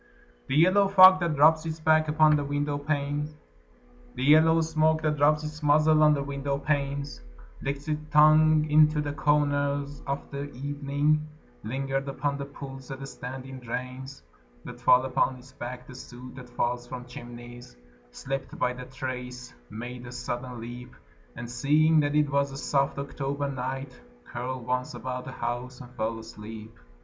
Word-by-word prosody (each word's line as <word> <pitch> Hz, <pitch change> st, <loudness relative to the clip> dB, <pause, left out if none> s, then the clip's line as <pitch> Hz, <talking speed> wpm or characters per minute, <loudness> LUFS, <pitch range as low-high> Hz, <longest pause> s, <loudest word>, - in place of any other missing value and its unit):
The 135 Hz, -, -1 dB
yellow 185 Hz, +6 st, +5 dB
fog 185 Hz, -1 st, +8 dB
that 170 Hz, -4 st, -1 dB
rubs 155 Hz, +2 st, +5 dB
its 160 Hz, -1 st, -5 dB
back 155 Hz, 0 st, +3 dB
upon 155 Hz, 0 st, +4 dB
the 145 Hz, -, 0 dB
window 145 Hz, +1 st, -1 dB
panes 145 Hz, +1 st, -2 dB, 0.8 s
The 125 Hz, -, -3 dB
yellow 160 Hz, +3 st, +6 dB
smoke 160 Hz, 0 st, +1 dB
that 150 Hz, -1 st, 0 dB
rubs 150 Hz, +1 st, +3 dB
its 155 Hz, 0 st, -7 dB
muzzle 155 Hz, +1 st, +4 dB
on 150 Hz, -1 st, +6 dB
the 140 Hz, -, -2 dB
window 140 Hz, 0 st, -3 dB
panes 140 Hz, -, -2 dB, 0.4 s
Licked 140 Hz, +2 st, -4 dB
its 155 Hz, 0 st, -1 dB
tongue 155 Hz, +1 st, +5 dB
into 150 Hz, 0 st, +5 dB
the 145 Hz, -1 st, -2 dB
corners 145 Hz, -1 st, 0 dB
of 140 Hz, +1 st, -4 dB
the 140 Hz, 0 st, -4 dB
evening 145 Hz, +3 st, 0 dB, 0.4 s
Lingered 135 Hz, +4 st, -2 dB
upon 140 Hz, +1 st, -2 dB
the 140 Hz, -, -4 dB
pools 135 Hz, -2 st, -10 dB
that 135 Hz, 0 st, -7 dB
stand 130 Hz, 0 st, -7 dB
in 135 Hz, 0 st, -9 dB
drains, 130 Hz, +2 st, -6 dB, 0.4 s
Let -, -, -9 dB
fall 125 Hz, +1 st, +5 dB
upon 130 Hz, 0 st, +1 dB
its 130 Hz, +1 st, -15 dB
back 125 Hz, +1 st, -7 dB
the 130 Hz, -, -12 dB
soot 125 Hz, 0 st, -11 dB
that 125 Hz, -2 st, -11 dB
falls 120 Hz, 0 st, -2 dB
from 125 Hz, 0 st, -7 dB
chimneys, 120 Hz, -, -11 dB, 0.3 s
Slipped 135 Hz, -, -5 dB
by 125 Hz, 0 st, 0 dB
the 125 Hz, 0 st, -8 dB
terrace, 125 Hz, -, -6 dB, 0.2 s
made 120 Hz, +2 st, -7 dB
a -, -, -8 dB
sudden 125 Hz, 0 st, -5 dB
leap, 120 Hz, +2 st, -9 dB, 0.4 s
And 120 Hz, -, -6 dB
seeing 150 Hz, +6 st, +3 dB
that 145 Hz, 0 st, +1 dB
it 150 Hz, -1 st, +2 dB
was 140 Hz, 0 st, +1 dB
a 135 Hz, -, -7 dB
soft 140 Hz, 0 st, 0 dB
October 140 Hz, 0 st, -3 dB
night, 130 Hz, -, -5 dB, 0.2 s
Curled 125 Hz, 0 st, -5 dB
once 125 Hz, +1 st, -2 dB
about 125 Hz, 0 st, -5 dB
the -, -, -7 dB
house, 125 Hz, +1 st, -4 dB
and 125 Hz, -1 st, -11 dB
fell 115 Hz, -2 st, -3 dB
asleep. 110 Hz, 0 st, -10 dB
140 Hz, 165 wpm, -27 LUFS, 125-150 Hz, 0.8 s, fog